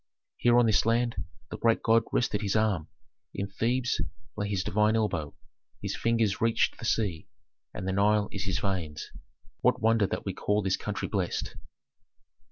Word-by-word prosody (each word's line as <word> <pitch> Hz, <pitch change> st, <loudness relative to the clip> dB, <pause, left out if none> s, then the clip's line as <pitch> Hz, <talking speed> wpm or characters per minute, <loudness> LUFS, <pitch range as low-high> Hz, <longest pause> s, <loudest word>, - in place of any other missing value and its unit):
Here 120 Hz, 0 st, +4 dB
on 120 Hz, -, +6 dB
this 110 Hz, -2 st, +3 dB
land 115 Hz, +1 st, +1 dB, 0.4 s
the -, -, -6 dB
great 115 Hz, -1 st, +2 dB
god 115 Hz, 0 st, +4 dB
rested 105 Hz, -4 st, +1 dB
his 100 Hz, -1 st, -1 dB
arm: 105 Hz, -8 st, +1 dB, 0.5 s
in 100 Hz, -, -1 dB
Thebes 120 Hz, +5 st, 0 dB, 0.3 s
lay 105 Hz, -1 st, -2 dB
his 95 Hz, -3 st, 0 dB
divine 105 Hz, +3 st, +2 dB
elbow, 105 Hz, -9 st, -1 dB, 0.4 s
his -, -, -3 dB
fingers 115 Hz, -3 st, +1 dB
reached 115 Hz, 0 st, +2 dB
the -, -, -6 dB
sea, 100 Hz, -7 st, 0 dB, 0.4 s
and 95 Hz, -, -6 dB
the -, -, +1 dB
Nile 105 Hz, +1 st, +3 dB
is 100 Hz, -1 st, -4 dB
his 95 Hz, -3 st, 0 dB
veins. 85 Hz, -7 st, -3 dB, 0.5 s
What 125 Hz, -, +2 dB
wonder 115 Hz, -2 st, +3 dB
that -, -, -4 dB
we 95 Hz, -, -2 dB
call 105 Hz, +2 st, 0 dB
this 95 Hz, 0 st, +2 dB
country -, -, -4 dB
blessed!" -, -, -2 dB
105 Hz, 170 wpm, -28 LUFS, 95-115 Hz, 0.5 s, on